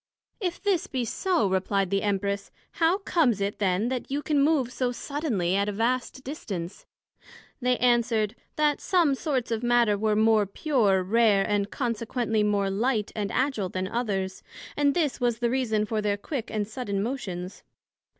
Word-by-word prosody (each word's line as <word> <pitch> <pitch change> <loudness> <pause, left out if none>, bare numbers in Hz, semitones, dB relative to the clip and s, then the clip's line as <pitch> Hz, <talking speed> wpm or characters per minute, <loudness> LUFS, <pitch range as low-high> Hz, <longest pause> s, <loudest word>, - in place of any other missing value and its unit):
If 360 -5 -2
this 395 -1 0
be 255 -3 -2
so, 295 - +1
replied 190 0 0
the 195 0 +2
Empress, 200 0 -1 0.2
How 335 +3 +2
comes 320 - +1
it 200 +1 -2
then 200 +3 +1
that 255 -2 -3
you 285 +2 -2
can 295 -2 +2
move 280 -5 +2
so 250 -1 0
suddenly 245 - -1
at 200 +1 +1
a - - -1
vast 245 +4 -1
distance? 195 - -6 0.7
They 250 0 +2
answered, 235 -3 +2 0.2
That 300 -1 +1
some 340 -6 +3
sorts 265 -4 -2
of 225 -1 -1
matter 240 -4 +3
were 215 0 +1
more 215 -1 +4
pure, 205 -5 +1
rare, 210 0 +3
and 205 -1 0
consequently 230 -2 -1
more 205 -2 +1
light 215 +1 0
and 205 -2 -2
agil 240 -6 0
then 185 0 -2
others; 195 -4 -2 0.3
and 285 -1 +2
this 295 -7 0
was 240 -2 +1
the 235 0 0
reason 225 -5 +1
for 215 0 -1
their 205 -1 0
quick 235 +3 -5
and 210 -2 -2
sudden 205 -4 -3
motions. 195 -7 -5
225 Hz, 170 wpm, -26 LUFS, 200-265 Hz, 0.7 s, more